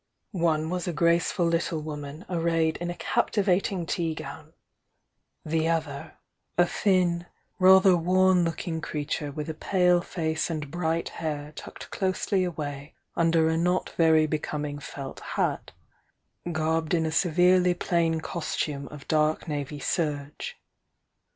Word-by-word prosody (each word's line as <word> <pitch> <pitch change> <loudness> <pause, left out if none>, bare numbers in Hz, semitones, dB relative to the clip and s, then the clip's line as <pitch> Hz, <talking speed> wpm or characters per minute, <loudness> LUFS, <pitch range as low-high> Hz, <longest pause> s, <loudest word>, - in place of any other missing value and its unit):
One 165 -4 0
was 180 -1 -2
a 175 - -1
graceful 170 +3 +2
little 165 -1 0
woman 150 +1 -7
arrayed 165 -2 +1
in 175 - -4
a 175 - -4
captivating 195 -5 +1
tea 165 -1 -1
gown; - - -9 0.9
the 160 +1 +1
other, 160 -2 -2 0.4
a 175 - +6
thin, 175 -2 +1 0.3
rather 190 0 +7
worn 185 +1 +3
looking 165 0 -3
crea 150 -2 -4
ture 145 0 -3
with 150 +1 -5
a 160 - -3
pale 180 +2 +2
face 160 -3 -2
and 150 -4 -4
bright 165 -1 -1
hair 150 -2 -4
tucked - - -10
closely 190 0 0
sway 145 -2 -6 0.2
under 165 -1 +3
a 160 0 +1
not 180 +2 +1
very 160 -1 +4
becoming 150 -1 -3
felt 140 -1 -7
hat, - - -2 0.8
garbed 160 +1 0
in 165 -1 +1
a - - 0
severiy 180 +2 +3
plain 165 -2 +1
costume 150 -4 -3
of 145 -2 -11
dark 155 +1 +1
navy 145 -1 -3
serge. 150 - -2
165 Hz, 135 wpm, -27 LUFS, 155-175 Hz, 0.9 s, rather